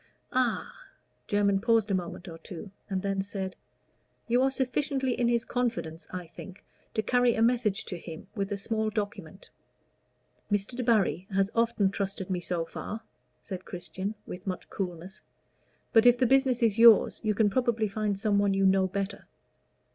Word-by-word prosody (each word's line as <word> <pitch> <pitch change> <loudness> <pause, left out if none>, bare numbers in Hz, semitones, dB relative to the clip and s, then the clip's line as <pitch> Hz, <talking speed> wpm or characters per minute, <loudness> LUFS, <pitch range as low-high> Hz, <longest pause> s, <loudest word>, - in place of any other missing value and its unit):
"Ah! 255 - -1
" - - -43
Jermyn 200 -1 +2
paused 225 -2 +2
a - - +2
moment 180 0 -3
or 165 -1 -8
two, 180 +3 -9 0.2
and 190 -1 -2
then 195 -1 0
said, 195 -1 -5 0.7
"You 245 +1 +3
are 265 - +4
sufficiently 265 0 0
in 240 - +1
his 235 0 +1
confidence, 230 -11 -2
I 180 -1 -5
think, 180 +3 -12 0.3
to 220 - +1
carry 245 +1 +3
a 225 - 0
message 230 -4 +1
to 180 - -6
him 165 +1 -9
with 200 -2 -3
a 205 - -1
small 220 +2 -1
document?" 215 - -5 1.0
"Mr. 205 +4 0
Debarry 220 -7 +1
has 195 +1 +1
often 230 -4 +2
trusted 195 -1 -3
me 180 - 0
so 175 -1 -2
far," 215 +6 -6 0.4
said 185 -3 -6
Christian, 190 +3 -5
with 180 +3 -8
much 185 -1 -4
coolness; 185 +1 -5 0.7
"but 225 +1 +6
if 245 0 +7
the 255 - +3
business 265 -1 +3
is 225 -1 +2
yours, 230 -2 +7
you 215 -2 0
can 205 -1 +3
probably 235 -2 +1
find 205 0 -1
some 205 0 +2
one 200 -1 +2
you 195 0 +2
know 190 0 +4
better." 195 +2 -4
205 Hz, 170 wpm, -29 LUFS, 190-235 Hz, 1.0 s, if